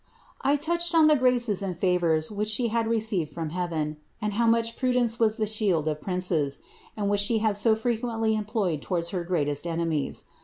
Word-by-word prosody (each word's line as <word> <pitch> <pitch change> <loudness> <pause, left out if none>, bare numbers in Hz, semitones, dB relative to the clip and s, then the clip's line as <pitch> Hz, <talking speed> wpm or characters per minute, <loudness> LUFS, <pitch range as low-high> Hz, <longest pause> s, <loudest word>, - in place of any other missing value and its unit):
I 280 - +3
touched 340 +3 0
on 320 -1 +6
the 305 0 +6
graces 245 -6 +2
and 185 -3 -3
favours 170 -4 +1
wliich 210 0 -3
she 230 +2 +1
had 230 0 0
received 220 -8 0
from 160 -1 -5
heaven, 160 -4 -2 0.2
and 210 -1 -2
how 230 +3 +1
much 230 0 +2
prudence 245 -3 0
was 220 -2 +3
the 220 -2 -1
shield 200 -7 +1
of 150 -1 -2
princes, 180 -7 -1 0.4
and 205 -1 -1
which 205 0 +2
she 220 +2 +2
liad 215 -2 +1
so 220 +2 +3
frequently 225 -1 -1
employed 210 - -1
towards 170 -2 -2
her 180 -2 -3
greatest 150 -3 -1
enemies. 165 -3 -2
210 Hz, 190 wpm, -26 LUFS, 170-230 Hz, 0.4 s, on